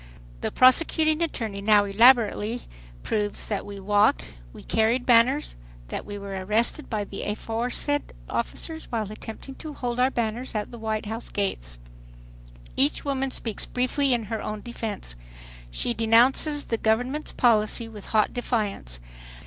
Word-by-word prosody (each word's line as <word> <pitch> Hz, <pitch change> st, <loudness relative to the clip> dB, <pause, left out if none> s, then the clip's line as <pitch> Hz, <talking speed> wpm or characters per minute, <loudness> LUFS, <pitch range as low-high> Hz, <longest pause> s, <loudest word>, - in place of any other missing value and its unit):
The -, -, -2 dB
prosecuting 310 Hz, +4 st, +4 dB
attorney 225 Hz, -11 st, -3 dB
now 205 Hz, 0 st, +5 dB
elaborately 225 Hz, +1 st, +4 dB, 0.4 s
proves 210 Hz, -1 st, -2 dB
that 205 Hz, -2 st, -2 dB
we 200 Hz, -1 st, -7 dB
walked, 205 Hz, -, +3 dB
that -, -, -11 dB, 0.2 s
we -, -, -12 dB
carried 225 Hz, +3 st, +1 dB
banners, 250 Hz, +4 st, +4 dB, 0.3 s
that -, -, -5 dB
we 205 Hz, 0 st, -6 dB
were 195 Hz, -1 st, -5 dB
arrested 225 Hz, +9 st, 0 dB
by 215 Hz, -3 st, -1 dB
the 200 Hz, 0 st, -7 dB
aforesaid 235 Hz, +7 st, -2 dB, 0.2 s
officers 320 Hz, -1 st, -3 dB
while 220 Hz, -3 st, -2 dB
attempting 220 Hz, +5 st, -9 dB
to 310 Hz, -3 st, -7 dB
hold 245 Hz, -1 st, -3 dB
our 255 Hz, +1 st, +4 dB
banners 235 Hz, 0 st, -3 dB
at 210 Hz, -1 st, -2 dB
the 235 Hz, -, -9 dB
White 220 Hz, -1 st, -2 dB
House 225 Hz, +2 st, -5 dB
gates. -, -, -3 dB, 1.0 s
Each 145 Hz, -, +3 dB
woman 270 Hz, -1 st, 0 dB
speaks 225 Hz, -4 st, -4 dB
briefly 260 Hz, +2 st, 0 dB
in 240 Hz, -2 st, +1 dB
her 220 Hz, +1 st, -4 dB
own 210 Hz, 0 st, -5 dB
defense. 220 Hz, -, -6 dB, 0.6 s
She -, -, 0 dB
denounces 245 Hz, +6 st, +3 dB
the 230 Hz, -, -2 dB
government's 245 Hz, +7 st, 0 dB
policy 225 Hz, -1 st, +2 dB
with 215 Hz, -3 st, -10 dB
hot 215 Hz, -1 st, +2 dB
defiance. 210 Hz, -, -3 dB
225 Hz, 150 wpm, -25 LUFS, 210-250 Hz, 1.0 s, now